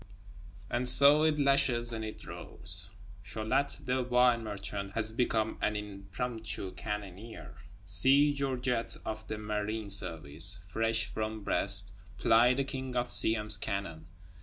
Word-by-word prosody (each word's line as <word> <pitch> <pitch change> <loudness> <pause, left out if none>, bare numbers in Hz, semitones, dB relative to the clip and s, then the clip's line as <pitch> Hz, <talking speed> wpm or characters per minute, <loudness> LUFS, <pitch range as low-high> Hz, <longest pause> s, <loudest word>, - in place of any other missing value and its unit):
And 125 +5 0
so 140 +4 +7
it 155 -1 +1
lashes 135 -4 +2
and 110 -1 -5
it 110 0 -8
roars. 95 +1 0 0.3
Cholat 110 +8 -2
the 130 +1 -1
wine 125 -1 +2
merchant 100 -2 -6
has 110 -1 -2
become 110 -2 -1
an 105 - -1
impromptu 105 +1 -5
cannoneer. 105 +2 -8 0.3
See 135 - +4
Georget 130 -4 -2
of 110 0 -6
the 110 - -5
marine 105 0 -4
service, 80 0 -1
fresh 115 +2 0
from 110 -1 -5
Brest, 100 0 +2 0.2
ply 115 +5 +3
the 140 - -1
King 130 -1 -6
of 120 0 -2
Siam's 110 -3 +4
cannon. 95 -6 -5
110 Hz, 130 wpm, -30 LUFS, 100-125 Hz, 0.3 s, so